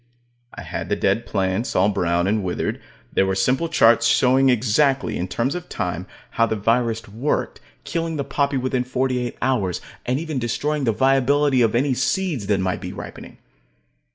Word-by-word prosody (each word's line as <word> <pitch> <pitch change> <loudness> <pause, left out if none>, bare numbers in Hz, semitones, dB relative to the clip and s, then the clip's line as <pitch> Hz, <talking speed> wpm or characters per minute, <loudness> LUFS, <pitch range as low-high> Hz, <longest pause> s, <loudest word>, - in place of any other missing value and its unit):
I - - -8
had - - -5
the - - +2
dead 115 - 0
plants, 95 +3 -1
all 95 +3 +4
brown 85 -3 0
and 105 +1 0
withered. 90 -1 -2 0.3
There 95 - +2
were 95 - 0
simple 130 +11 +1
charts 115 -3 +4
showing 130 +2 +4
exactly, 130 +3 +2
in 90 - -2
terms 120 +8 -1
of 180 0 -6
time, 90 -2 -3 0.2
how 115 - +2
the 110 - -1
virus 115 +1 0
worked, 115 +9 -2 0.2
killing 165 -1 -3
the 140 - -2
poppy 140 0 0
within 130 0 0
forty 130 0 -1
eight 120 -1 -4
hours, 110 -9 0 0.2
and 125 +3 -1
even 155 -4 -3
destroying 145 +4 -1
the 115 - +3
viability 135 +2 +3
of 115 -1 +2
any 135 +3 +2
seeds 130 - -1
that 100 -2 +2
might 95 -1 -1
be - - -5
ripening. - - -9
125 Hz, 180 wpm, -22 LUFS, 105-135 Hz, 0.3 s, all